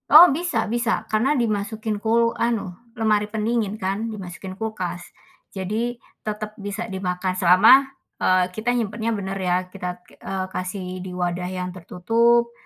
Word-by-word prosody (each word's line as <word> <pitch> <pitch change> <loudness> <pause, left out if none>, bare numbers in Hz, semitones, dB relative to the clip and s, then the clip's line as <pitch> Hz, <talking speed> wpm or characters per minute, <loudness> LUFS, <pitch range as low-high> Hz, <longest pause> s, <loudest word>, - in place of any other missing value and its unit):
Oh, 310 +4 +11
bisa 345 +4 -1
bisa. 235 -1 0
Karena 255 +7 +2
dimasukin 215 -2 -1
kul 230 +1 +2
anu 230 -6 0 0.2
lemari 210 -2 +2
pendingin, 220 -1 -1
kan, 200 +3 -2
dimasukin 185 -2 -8
kulkas. 185 -6 -3 0.5
Jadi 215 +6 -2 0.3
tetep 215 0 -4
bisa 205 +2 -4
dimakan 185 -1 -2
selama, 185 +6 +7 0.5
eee, 185 0 +3
kita 225 +3 0
nyimpennya 225 0 -1
bener 195 -1 -4
ya, 180 -1 +1
kita 180 -2 -5
k - - -20
eee, 190 -1 -3
kasih 185 0 -4
di 185 - -6
wadah 180 0 -2
yang 180 -1 -4
tertutup, 230 +7 +2
210 Hz, 140 wpm, -23 LUFS, 185-230 Hz, 0.5 s, Oh